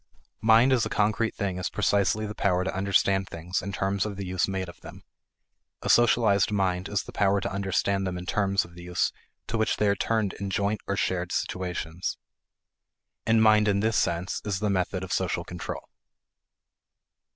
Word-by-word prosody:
Mind 115 +4 +5
as 120 -4 +3
a - - -2
concrete 110 +2 +1
thing 95 -3 -2
is 90 - -2
precisely 105 +2 +1
the 105 - -5
power 90 -3 +1
to 95 - -3
understand 95 0 +2
things 85 +3 -3
in 100 - -5
terms 95 0 0
of 105 -2 -4
the 100 - -4
use 95 0 0
made 95 -1 -3
of 85 - -12
them; - - -11 0.8
a - - -2
socialized 115 -4 +4
mind 95 -2 0
is 100 - -1
the - - -10
power 100 0 +2
to - - -3
understand 95 0 0
them 90 -1 -3
in 90 - -7
terms 100 0 +1
of 85 - -16
the 90 - -11
use 90 0 0 0.3
to 115 - -2
which 110 - +1
they 105 - +2
are 100 - +3
turned 110 -2 0
in 100 0 -5
joint 100 +1 -1
or 100 - -1
shared 90 -2 -1
situations. 90 -1 -3 1.1
And 110 0 +4
mind 105 -1 +5
in 100 -1 +2
this 110 0 +1
sense 85 0 0
is 100 -3 -1
the 105 -1 0
method 95 0 -1
of 95 - -4
social - - -1
control. - - -7
100 Hz, 190 wpm, -27 LUFS, 95-105 Hz, 1.1 s, Mind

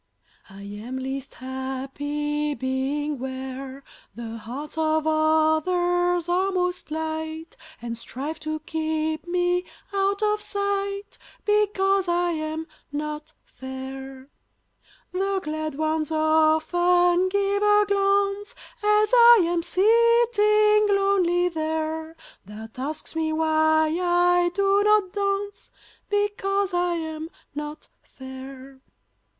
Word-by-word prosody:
I 195 +1 -11
am 210 +6 -7
least 265 +1 -5
happy 285 +3 -3
being 270 +2 -2
where 265 +1 -6 0.3
The 230 0 -6
hearts 255 +7 -7
of 315 -1 +1
others 320 +3 +2
are 370 +3 +1
most 360 -2 -1
light, 315 +1 -4 0.2
And 235 -1 -5
strive 275 +7 -6
to 310 0 -4
keep 315 +1 -2
me 355 0 +1 0.3
out 395 +1 0
of 420 0 +1
sight, 400 0 -3 0.3
Because 395 -2 +2
I 350 0 +1
am 315 0 -3 0.3
not 300 +1 -5
fair; 265 +1 -9 0.8
The 385 +1 0
glad 310 -1 -4
ones 310 0 -1
often 345 +3 +3
give 400 +1 0
a 415 0 +4
glance, 400 0 +1 0.3
As 420 0 +3
I 475 -2 +8
am 345 0 0
sitting 425 0 +4
lonely 360 -3 +2
there, 320 -1 -3 0.3
That 220 +3 -10
asks 300 +4 -5
me 320 -1 0
why 315 0 +2
I 350 0 +3
do 395 0 +3
not 420 -3 +3
dance 400 0 -2 0.4
Because 400 -1 0
I 350 0 +1
am 320 -1 -5 0.2
not 295 +1 -7
fair. 265 0 -11
320 Hz, 105 wpm, -24 LUFS, 295-390 Hz, 0.8 s, I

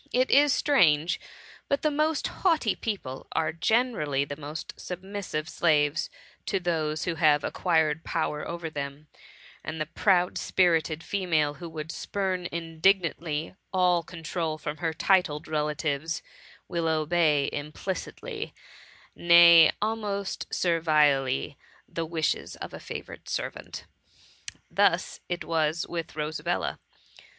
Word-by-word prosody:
It 255 +1 +2
is 290 +1 +6
strange, 170 - +3 0.5
but 280 - 0
the 305 - +2
most 305 +1 +1
haughty 320 - +1
people 165 - -5
are 160 -1 0
generally 165 - +1
the 145 - -6
most 150 +2 -7
submissive 185 -4 -5
slaves 155 -1 +2 0.4
to 195 - +1
those 160 -3 -1
who 175 - 0
have 150 -2 +5
acquired 160 -3 +1
power 150 -2 -2
over 170 -1 -4
them, 145 0 -6 0.5
and 155 0 -5
the 155 - 0
proud 180 +2 +2
spirited 165 -3 +2
female 160 -7 0
who 170 +2 -8
would 160 0 -6
spurn 185 -2 -2
indignantly 165 -1 0 0.2
all 180 -2 +3
control 165 -1 -4
from 150 0 -5
her 165 +1 -1
titled 160 -2 +1
relatives, 150 0 -2 0.4
will 170 -2 -1
obey 155 -2 +2
implicitly 190 - -5 0.3
~ - - -25
nay, 170 -1 +8
almost 205 -3 -3
servilely, 150 - +2 0.3
the 165 -1 -4
wishes 160 -2 -1
of - - -8
a - - -7
favourite - - -8
servant. - - -5 0.9
Thus - - +2
it 175 -1 -2
was 160 0 0
with 165 -3 -5
Rosabella. 155 +3 -2
165 Hz, 120 wpm, -27 LUFS, 150-185 Hz, 0.9 s, nay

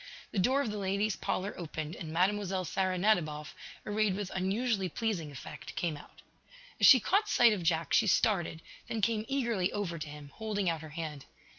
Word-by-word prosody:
The 200 - -1
door 265 +9 +3
of 220 - -3
the 210 - -4
ladies' 200 +2 0
parlor 195 +3 -2
opened, 155 -2 -5
and 160 -3 -7
Mlle. 190 +1 +1
Sara 185 +1 0
Nadiboff, 155 -7 +1 0.3
arrayed 210 -2 +1
with 200 -1 -4
unusually 195 +1 0
pleasing 175 -6 -2
effect, 135 - -9
came 170 -3 -1
out. 145 - -14 0.6
As - - +7
she 260 - +10
caught 405 - +1
sight 240 - +6
of 200 - -3
Jack 165 -1 0
she 220 - +4
started, 175 -5 +1 0.2
then 225 - -3
came 215 +1 +1
eagerly 235 -9 0
over 180 -5 -3
to 155 - -5
him, 145 -1 -10
holding 210 -3 -2
out 160 -2 -4
her 155 - -9
hand. 150 -3 -6
190 Hz, 185 wpm, -31 LUFS, 165-215 Hz, 0.6 s, she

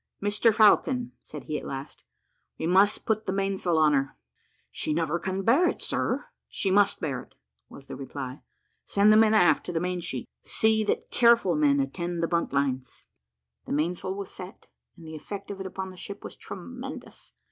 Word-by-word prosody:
"Mr 205 +3 +2
Falcon," 240 +3 +4
said 150 -3 -9
he 150 -1 -3
at - - -12
last, 135 +1 -7 0.5
"we - - -3
must 195 +4 +3
put 215 -1 0
the - - +1
mainsail 195 -3 0
on 155 -1 +4
her." 135 -1 0 0.5
"She 150 - -2
never 165 0 0
can 190 +2 -3
bear 275 - +4
it, - - -2
sir." - - -1 0.2
"She 195 - -1
must 200 +1 +3
bear 140 -5 -2
it," - - -19 0.3
was 135 - -13
the - - -8
reply. 135 0 -7 0.4
"Send 205 +1 +4
the - - +6
men 220 0 +5
aft 180 -5 +4
to - - -2
the 165 - -1
mainsheet. 175 -8 -3
See 220 0 +2
that - - -2
careful 235 -6 +4
men 145 -2 +3
attend 170 +5 -2
the - - +2
buntlines." 140 -6 -1 0.6
The - - -2
mainsail 175 +5 -1
was 200 -1 -6
set, 185 +1 -10 0.3
and 165 - -13
the 160 0 -8
effect 200 +6 -7
of 195 - -7
it 190 - -4
upon 190 0 -6
the 185 - -14
ship 200 +2 -8
was - - -8
tremendous. 250 +8 -9
185 Hz, 185 wpm, -27 LUFS, 155-205 Hz, 0.6 s, the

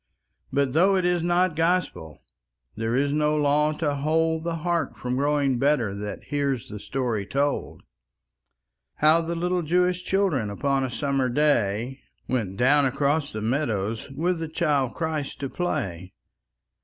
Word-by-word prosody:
But 140 -2 +1
though 185 +5 +4
it 185 -2 +1
is 180 -1 +2
not 175 0 +2
Gospel, 165 - -1 0.5
There 115 +2 -1
is 140 +2 +1
no 150 0 +2
law 150 +1 +3
to 150 -1 -1
hold 160 +3 0
The 170 0 -2
heart 170 -5 -1
from 125 0 -3
growing 140 -2 +1
better 135 -7 +2
That 105 +1 -6
hears 140 -4 -2
the 105 - -7
story 120 -4 -2
told: 140 +1 -1 1.1
How 155 +2 +4
the 165 +1 -3
little 180 +1 0
Jewish 180 +2 +1
children 180 - +1
Upon 135 +6 0
a 130 - -1
summer 135 -1 0
day, 125 -2 +1 0.3
Went 105 -7 -2
down 140 +3 +4
across 145 +3 0
the 110 - -5
meadows 110 -3 -1
With 165 +6 -1
the 165 -1 -4
Child 145 -6 0
Christ 160 -4 -3
to 135 - -2
play. 95 - -3
145 Hz, 150 wpm, -25 LUFS, 125-160 Hz, 1.1 s, though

